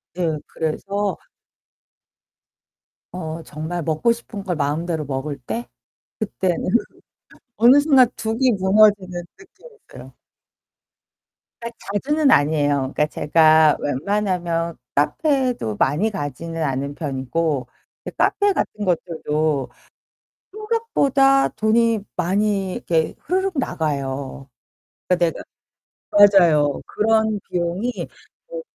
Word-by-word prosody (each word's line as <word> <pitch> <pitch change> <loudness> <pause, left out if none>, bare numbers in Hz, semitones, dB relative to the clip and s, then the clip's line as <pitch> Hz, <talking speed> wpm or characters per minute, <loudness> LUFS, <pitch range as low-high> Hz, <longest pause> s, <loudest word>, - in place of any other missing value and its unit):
네. 165 -4 -1
그래서 200 +5 -3 1.9
어 165 -2 -6
정말 160 +3 -5
먹고 160 +9 +1
싶은 230 -3 -6
걸 180 -3 -2
마음대로 155 +2 -2
먹을 140 +1 -4
때 230 - -5 0.5
그때는 190 -5 -2 0.9
어느 240 +6 +6
순간 275 -4 +5
둑이 230 +4 0
무너지는 190 -2 +3 0.2
느낌이었어요. 445 +4 -15 1.5
아 235 - -5 0.3
자주는 295 +8 +1
아니에요. 145 - +2
그러니까 150 - +2
제가 155 0 +4
웬만하면 170 +1 -1 0.2
카페도 250 - 0
많이 155 - +1
가지는 165 - -5
않는 140 0 -2
편이고 140 -1 -2 0.4
이제 - - -5
카페 410 0 +2
같은 210 - -3
것들도 155 -5 -1 0.8
생각보다 335 - +2
돈이 225 +1 +2 0.2
많이 195 +1 0
이렇게 160 -2 -1
흐르륵 375 -1 -1
나가요. 140 - -3 0.6
그러니까 175 -2 +1
내가 - - -9 1.0
맞아요. 150 -5 +2
그런 220 -1 +1
비용이 180 +7 -1 0.6
뭐 - - -6
175 Hz, 230 characters per minute, -21 LUFS, 150-225 Hz, 1.9 s, 어느